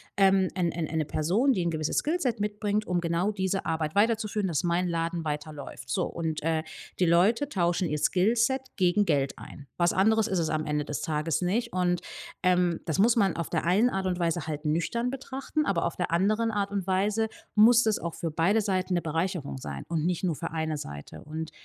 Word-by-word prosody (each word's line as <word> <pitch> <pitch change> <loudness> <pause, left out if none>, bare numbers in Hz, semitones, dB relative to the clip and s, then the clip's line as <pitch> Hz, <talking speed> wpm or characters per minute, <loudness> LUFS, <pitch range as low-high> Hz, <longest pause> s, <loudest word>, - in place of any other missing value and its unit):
ähm, 195 -1 +4
ein 175 -3 0
ein 165 -2 -3
eine 160 0 -1
Person, 195 - +2
die 185 - 0
'n 170 - +1
gewisses 155 -1 -2
Skillset 295 -8 0
mitbringt, 210 0 -1
um 180 -1 0
genau 170 +4 0
diese 190 -1 -2
Arbeit 160 -1 -2
weiterzuführen, 215 -1 +1
dass 165 -2 -1
mein 175 +1 +1
Laden 170 0 -2
weiterläuft.“ 150 -4 -6
So - - 0
und, 160 -3 -3
äh, 160 0 +1 0.4
die 180 - +4
Leute 205 - +3
tauschen 175 - 0
ihr 150 - -1
Skillset 225 - +2 0.2
gegen 190 +2 +3
Geld 140 -6 0
ein. 140 - -11
Was 175 0 +3
anderes 220 +3 +3
ist 190 -4 0
es 160 -2 0
am 155 0 -1
Ende 150 0 -1
des 145 0 -4
Tages 155 +1 -1
nicht 225 +7 0
und, 180 -1 0 0.4
ähm, 180 -2 +2
das 160 +2 -2
muss 230 +4 +5
man 195 -6 +2
auf 170 - -3
der 165 - -1
einen 195 +8 +3
Art 195 -4 -2
und 180 -1 -1
Weise 170 -1 -1
halt 150 0 -4
nüchtern 170 +11 0
betrachten, 270 +3 -3
aber 175 -4 +1
auf 170 - -2
der 180 - -2
anderen 215 +6 +2
Art 200 -2 -1
und 200 -3 -2
Weise 205 +4 +1 0.3
muss 230 +3 +7
das 220 -2 +1
auch 170 -1 -4
für 165 - -3
beide 170 +8 +2
Seiten 190 -3 -1
'ne 175 - +1
Bereicherung 165 -1 -2
sein 70 - -6
und 165 -2 -1
nicht 180 +1 0
nur 170 -4 0
für 165 - -5
eine 160 -1 -2
Seite. 75 - -8
Und 160 +2 -6
180 Hz, 210 wpm, -28 LUFS, 160-205 Hz, 0.4 s, muss